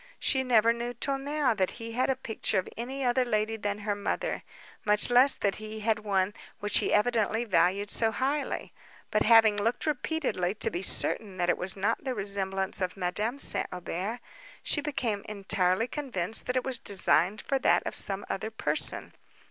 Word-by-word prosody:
She 265 - +2
never 230 -2 +4
knew 240 +1 -5
till 275 -1 -1
now 285 -1 0
that 190 -4 0
he 230 -1 -7
had 250 +4 0
a 265 - +2
picture 225 -5 -2
of 185 - 0
any 260 +4 -4
other 250 +1 +2
lady 220 -2 0
than 205 -1 -3
her 210 0 -2
mother, 205 - -3 0.4
much 210 +3 +2
less 255 +3 +6
that 200 -1 -1
he 215 0 -7
had 220 0 +1
one 200 -2 0 0.3
which 205 0 +3
he - - -1
evidently 225 +1 +1
valued 195 +1 +1
so 225 - +1
highly; 275 +5 -2 0.4
but 215 - +2
having 225 -2 +6
looked 225 +4 0
repeatedly, 275 - -1
to - - 0
be 175 - -3
certain 195 0 0
that 175 -1 0
it - - -2
was 190 +2 -1
not 205 +4 -1
the 260 -2 -3
resemblance 195 -1 -2
of 185 +1 -2
Madame 205 +7 -1
St. - - 0
Aubert, 180 +6 -4 0.4
she 290 - +3
became 240 -8 -2
entirely 195 0 +1
convinced 225 - -1
that 250 +1 0
it 255 - 0
was 260 -3 0
designed 195 0 +3
for 275 - -1
that - - +3
of - - -3
some 195 0 -1
other 215 +3 -3
person. 220 - -1
215 Hz, 185 wpm, -28 LUFS, 200-245 Hz, 0.4 s, less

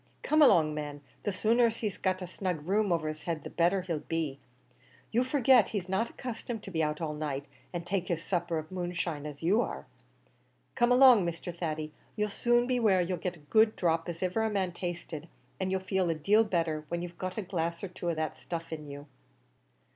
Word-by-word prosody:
Come 310 +1 +3
along, 160 - +6
man; 145 -1 -5 0.2
the 205 - -1
sooner 230 +5 +3
he's 220 -3 -4
got 185 -1 0
a - - -3
snug 180 -4 -3
room 205 0 +2
over 165 -2 +1
his 155 0 -4
head 165 -3 -2
the - - -7
better 180 +2 +2
he'll 170 -4 -2
be. 155 -4 -3 0.7
You 240 +3 +3
forget 260 -4 +4
he's 195 -4 -3
not 190 +5 0
accustomed 235 -2 -6
to 195 - -8
be 160 -2 0
out 150 +1 -1
all 155 -2 -2
night, 145 -2 -3 0.3
and 175 -1 -4
take 185 0 -1
his 165 -2 -1
supper 175 -3 -1
of 155 +1 -6
moonshine, 175 -4 -3
as 145 +1 -9
you 200 +8 +4
are. - - -4 0.9
Come 240 0 +3
along, 250 -5 +8
Mr. 170 0 -4
Thady; 155 -3 -3 0.2
you'll 210 0 0
soon 240 +3 +2
be 250 0 +1
where 205 -5 +4
you'll 175 0 -2
get 180 0 -3
as 150 - -20
good 220 0 +7
a - - -10
dhrop 165 -1 0
as 170 +1 -4
iver 220 +5 +1
man 195 -4 0
tasted, 170 -3 -5 0.3
an' 190 -1 -1
you'll 190 0 +1
feel 190 -1 0
a 165 - +1
deal 205 +9 +4
better 165 -6 -1
when 170 0 -2
you've 175 -1 -8
got 185 +1 -4
a 215 - -1
glass 170 -2 -2
or - - -1
two 180 -1 -4
of 170 - 0
that 155 -1 -2
stuff 165 -1 -6
in 150 -2 -6
you." 145 0 -8
175 Hz, 215 wpm, -30 LUFS, 160-205 Hz, 0.9 s, along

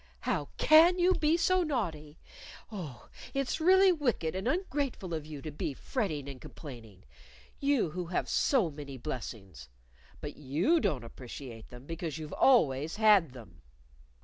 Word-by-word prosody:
"How - - -1
can 330 +4 +6
you 360 +1 +4
be 315 -1 +2
so 370 +2 +3
naughty! 170 - -3 0.5
Oh, 165 - -8 0.3
it's 275 +3 -1
really 380 +3 +6
wicked 245 - 0
and 190 +5 -3
ungrateful 280 - -2
of 155 -2 -4
you 150 -3 -8
to 155 - -5
be 145 -1 -4
fretting 155 - -3
and 135 -2 -8
complaining 115 - -11 0.6
you 275 - +1
who 175 +1 -4
have 175 - -1
so 225 - +2
many 140 -2 -8
blessings! 100 - -7 0.5
But 145 - -7
you 150 - +2
don't 135 - -1
appreciate 120 -1 -9
them 125 +2 -12
because 165 -1 -5
you've 155 -1 -7
always 155 - +3
had 205 - +4
them. 105 -9 -13
160 Hz, 150 wpm, -30 LUFS, -, 0.6 s, can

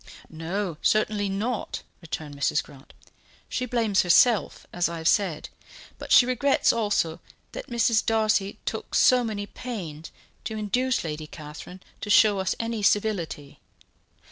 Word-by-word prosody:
"No, 170 +2 -4
certainly 210 -1 +1
not," 215 +4 -3 0.2
returned 155 -3 -6
Mrs. 140 - 0
Grant; 135 -1 -16 0.5
"she 250 - -3
blames 225 -5 +2
herself, 205 +5 +3
as 175 -1 +1
I 170 - -5
have 160 0 -2
said; 185 -7 +1 0.5
but - - -8
she 245 - +8
regrets 255 +2 +2
also 205 -8 0 0.3
that - - -7
Mrs. 230 -1 +2
Darcy 215 -3 +1
took - - -4
so 250 -1 +5
many 210 -3 -3
pains 180 -11 -7 0.3
to 220 - -4
induce 250 +5 0
Lady 155 -1 -5
Catherine 155 +5 -10 0.2
to 210 - -5
show 210 -1 +5
us 190 - -1
any 230 -1 -2
civility. 195 -9 -1
205 Hz, 140 wpm, -25 LUFS, 165-225 Hz, 0.5 s, she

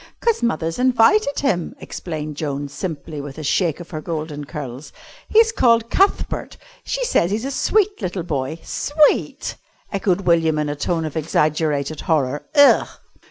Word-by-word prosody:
"'Cause 465 -2 +1
mother's 165 -8 -1
invited 255 - +3
him," 185 - -1
explained 155 -3 -6
Joan 145 -1 -3
simply, 150 -1 -5
with 140 0 -9
a 155 - -6
shake 165 +2 +1
of 175 - -10
her 155 -2 -4
golden 155 -3 -5
curls. 140 -2 -7 0.4
"He's 450 +1 +5
called 230 - +3
Cuthbert. 390 +1 +1 0.3
She - - -2
says 175 - +2
he's 215 +5 -2
a 275 - -2
sweet 410 - +1
little 180 -2 -3
boy." 145 -2 -3
"Sweet!" 295 +1 +1 0.4
echoed 195 -1 +1
William 165 -4 +2
in 150 -1 -1
a 145 - -2
tone 165 +2 -1
of 155 - -6
exaggerated 155 -1 0
horror. 145 -4 0
"Ugh!" 285 -1 +6
165 Hz, 155 wpm, -21 LUFS, 150-235 Hz, 0.4 s, Ugh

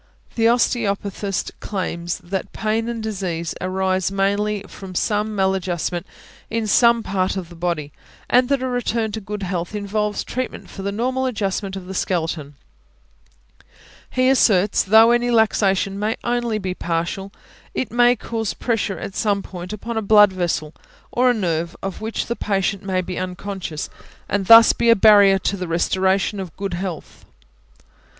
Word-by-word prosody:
The 225 -1 +2
osteopathist 205 -5 0
claims 175 -4 -3
that 190 +2 -4
pain 225 +1 -1
and 230 -2 -4
disease 185 -6 -3
arise 185 0 0
mainly 200 +1 0
from 190 -2 -10
some 210 +2 0
mal 190 -1 +2
adjustment 175 -2 -3 0.4
in 225 -1 -1
some 235 +2 +4
part 190 -1 -1
of 180 -3 -5
the 175 - -12
body, 165 -4 -2 0.4
and 250 0 +3
that 275 -2 +1
a - - 0
return 235 -3 -1
to 220 +1 -5
good 210 0 -6
health 180 +1 -3
involves 210 0 -2
treatment 255 0 -5
for 195 - -8
the 200 +1 -2
normal 255 +5 -1
adjustment 200 -4 -2
of 190 -2 -7
the 190 - -7
skeleton; 165 -6 -2 1.5
he 255 0 +1
asserts, 210 -7 +4
though 220 +4 +6
any 240 0 +2
luxation 200 -4 +2
may 210 +2 0
be - - -15
only 240 -2 -1
partial, 170 +3 -3 0.4
it 260 - -2
may 245 +1 +4
cause 225 -3 -4
pressure 225 -5 -1
at 195 - -6
some 205 -2 0
point 180 -1 -8
upon 225 +2 -5
a - - +1
blood 210 -1 +6
vessel, 170 -4 -2 0.4
or 250 +1 +3
a - - +4
nerve 170 -4 -1
of 195 +1 -5
which 220 +1 -3
the 235 - -3
patient 195 -2 -1
may 190 -2 -1
be 180 0 -5
unconscious, 185 -3 -5 0.4
and 195 -1 -1
thus 230 0 +9
be 235 - +1
a 230 - +8
barrier 200 -2 +6
to 195 - -1
the 180 -2 -5
restoration 190 +4 +1
of 185 -5 -7
good 195 -2 -3
health. 175 -2 -6
200 Hz, 160 wpm, -21 LUFS, 185-225 Hz, 1.5 s, thus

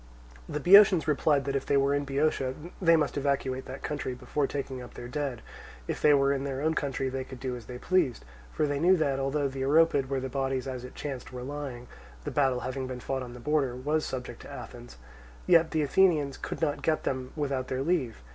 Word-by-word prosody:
The - - -2
Boeotians 190 0 +7
replied 145 -1 +2
that 140 0 -2
if 135 - 0
they 140 - +3
were 140 +1 +3
in 145 0 0
Boeotia, 135 -2 0 0.3
they 165 -2 +6
must 155 -2 0
evacuate 135 -2 -1
that 130 +1 -8
country 145 -4 -3
before 140 +3 -1
taking 135 -2 -4
up 120 - -11
their 120 - -7
dead; 135 -2 -3 0.4
if - - -3
they 150 - +6
were 140 0 +3
in 135 -1 -2
their 135 -1 -3
own 160 +3 +1
territory, 135 -3 -1
they 130 0 -3
could 130 -1 -10
do 125 0 -3
as 120 -2 -10
they 125 - -7
pleased: 165 -5 +1 0.3
for 155 - 0
they 145 -1 -1
knew 180 +4 +5
that, 140 -4 0
although 140 +1 0
the 135 0 -5
Oropid 145 -1 +3
where 135 -1 0
the 130 - -3
bodies 135 -1 -2
as 130 -2 -5
it 125 - -10
chanced 135 -4 -6
were 125 -1 -6
lying 135 -3 -6 0.4
(the - - -4
battle 135 -3 +2
having 130 +1 -3
been 130 -1 -5
fought 135 +2 -3
on 125 -1 -7
the - - -9
borders) 135 -2 -1
was 155 +1 +1
subject 125 -1 -5
to - - -11
Athens, - - -10 0.5
yet 165 -2 +5
the 155 -2 0
Athenians 150 -3 +3
could - - -6
not 145 -2 0
get 155 -1 0
them 130 -1 -3
without 135 -4 -2
their 130 +1 -2
leave. 130 - -1
135 Hz, 225 wpm, -28 LUFS, 130-150 Hz, 0.5 s, Boeotians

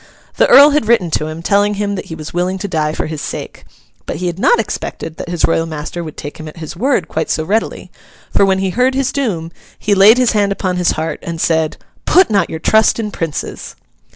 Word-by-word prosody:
The - - +4
Earl 285 +4 +8
had 285 -7 +1
written 215 -8 +2
to 155 - -1
him, 155 +2 -7
telling 205 +2 +2
him 205 0 -2
that 195 - -5
he 160 - -6
was 155 -1 -8
willing 180 +2 -1
to 200 - -4
die 155 -4 -1
for - - -3
his 155 -2 -5
sake. - - -7 0.4
But - - -3
he 180 - -4
had 175 +1 -3
not 480 - +4
expected 160 - -4
that - - -6
his 175 -2 +1
royal 165 0 0
master 160 +2 -5
would 155 -2 -9
take 145 +3 -8
him 155 - -8
at 155 - -11
his 160 0 -7
word 235 - 0
quite 160 - -3
so 155 - 0
readily; 215 +6 -2 0.4
for, - - +4
when 190 -1 +3
he 190 -1 -1
heard 250 +5 +1
his 265 -1 0
doom, 185 -12 -2 0.3
he 210 - 0
laid 200 +4 +7
his 250 -2 +3
hand 205 -2 +1
upon 185 -2 -2
his 180 -1 +2
heart, 160 +1 -3
and 170 -1 -6
said, 160 -2 +1 0.3
'Put 370 -9 +4
not 200 -4 +2
your 160 - -4
trust 220 +7 +3
in 210 -2 -3
Princes! 165 -6 -5
180 Hz, 235 wpm, -16 LUFS, 160-210 Hz, 0.4 s, Earl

